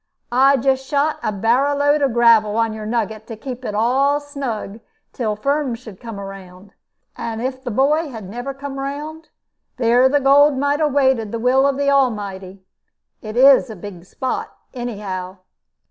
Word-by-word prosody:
I 270 Hz, +3 st, +4 dB
just 265 Hz, +1 st, +1 dB
shot 295 Hz, +2 st, 0 dB
a -, -, -1 dB
barrow 240 Hz, +8 st, +1 dB
load 290 Hz, +1 st, +2 dB
of 275 Hz, -2 st, +2 dB
gravel 225 Hz, -3 st, +4 dB
on 225 Hz, -1 st, +1 dB
your 215 Hz, -1 st, -6 dB
nugget, 220 Hz, -1 st, -3 dB
to 225 Hz, -, -7 dB
keep 250 Hz, +3 st, -8 dB
it 210 Hz, -, -4 dB
all 270 Hz, +6 st, +2 dB
snug 265 Hz, -8 st, -5 dB, 0.3 s
till 220 Hz, -4 st, -2 dB
Firm 275 Hz, +2 st, -1 dB
should 225 Hz, -5 st, -12 dB
come 230 Hz, -4 st, -8 dB
round; 195 Hz, 0 st, -11 dB, 0.4 s
and 225 Hz, -1 st, -5 dB
if 260 Hz, +2 st, -4 dB
the 250 Hz, -, -4 dB
boy 290 Hz, +7 st, +1 dB
had 220 Hz, -7 st, -8 dB
never 245 Hz, +7 st, -5 dB
come 275 Hz, 0 st, -7 dB
round, 295 Hz, +4 st, -6 dB, 0.5 s
there 245 Hz, +1 st, +4 dB
the 290 Hz, +2 st, +2 dB
gold 280 Hz, +1 st, +5 dB
might 285 Hz, +2 st, 0 dB
have 305 Hz, -2 st, +1 dB
waited 265 Hz, -6 st, +2 dB
the 230 Hz, -, -3 dB
will 255 Hz, +4 st, +3 dB
of 275 Hz, -1 st, 0 dB
the 280 Hz, 0 st, +1 dB
Almighty. 200 Hz, -8 st, -1 dB, 0.6 s
It 215 Hz, +1 st, -7 dB
is 265 Hz, 0 st, +6 dB
a 220 Hz, -, -7 dB
big 180 Hz, -2 st, -10 dB
spot, 260 Hz, +7 st, -4 dB, 0.2 s
anyhow." 200 Hz, -7 st, -5 dB
245 Hz, 175 wpm, -20 LUFS, 215-275 Hz, 0.6 s, is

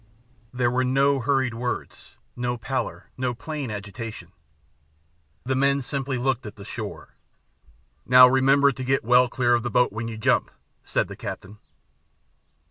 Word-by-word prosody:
There 125 Hz, -1 st, 0 dB
were 130 Hz, +1 st, +1 dB
no 135 Hz, +2 st, +2 dB
hurried 130 Hz, -1 st, 0 dB
words, 120 Hz, +2 st, -5 dB, 0.2 s
no 120 Hz, 0 st, -2 dB
pallor, 130 Hz, +3 st, -4 dB
no 125 Hz, -1 st, -2 dB
plain 150 Hz, 0 st, -5 dB
agitation. 105 Hz, -2 st, -7 dB, 1.1 s
The 130 Hz, -, -1 dB
men 140 Hz, +1 st, +2 dB
simply 135 Hz, 0 st, -3 dB
looked 130 Hz, 0 st, -1 dB
at 105 Hz, -, -9 dB
the 100 Hz, -, -11 dB
shore. -, -, -7 dB, 0.9 s
"Now, 125 Hz, 0 st, +9 dB
remember 135 Hz, +2 st, +4 dB
to 130 Hz, 0 st, -7 dB
get 135 Hz, +1 st, +1 dB
well 125 Hz, +1 st, +5 dB
clear 120 Hz, -1 st, +1 dB
of 120 Hz, -, +2 dB
the 120 Hz, -, -3 dB
boat 125 Hz, -1 st, +2 dB
when 115 Hz, +1 st, -4 dB
you 115 Hz, -1 st, -6 dB
jump," 110 Hz, -, +1 dB, 0.3 s
said -, -, -1 dB
the -, -, -9 dB
captain. 105 Hz, +3 st, -8 dB
125 Hz, 150 wpm, -24 LUFS, 120-135 Hz, 1.1 s, Now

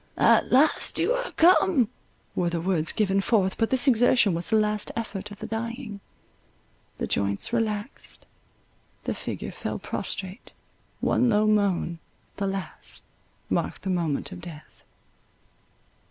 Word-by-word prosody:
—"At -, -, +4 dB
last 275 Hz, +5 st, +3 dB
you -, -, +2 dB
are -, -, -3 dB
come!" 340 Hz, -, +5 dB, 0.5 s
were 175 Hz, -1 st, 0 dB
the 170 Hz, 0 st, -2 dB
words 165 Hz, -2 st, 0 dB
given 195 Hz, -2 st, +1 dB
forth—but 210 Hz, +1 st, +1 dB
this 260 Hz, +1 st, +2 dB
exertion 240 Hz, -4 st, +5 dB
was 170 Hz, +1 st, -3 dB
the 220 Hz, -, +3 dB
last 210 Hz, -1 st, +1 dB
effort 210 Hz, -3 st, -4 dB
of 205 Hz, -, -10 dB
the -, -, -7 dB
dying—the 230 Hz, -1 st, -5 dB, 1.0 s
joints 100 Hz, -, -1 dB
relaxed, 220 Hz, 0 st, -3 dB, 0.8 s
the -, -, -1 dB
figure -, -, -5 dB
fell -, -, -4 dB
prostrate, 190 Hz, +4 st, -5 dB, 0.5 s
one 250 Hz, -, +3 dB
low 210 Hz, -1 st, +3 dB
moan, 200 Hz, -5 st, +1 dB, 0.4 s
the 200 Hz, -, -1 dB
last, 195 Hz, 0 st, -5 dB, 0.4 s
marked -, -, -2 dB
the 190 Hz, -, -1 dB
moment 170 Hz, -2 st, -1 dB
of 185 Hz, -2 st, -8 dB
death. 160 Hz, -3 st, -11 dB
205 Hz, 130 wpm, -26 LUFS, 185-235 Hz, 1.0 s, come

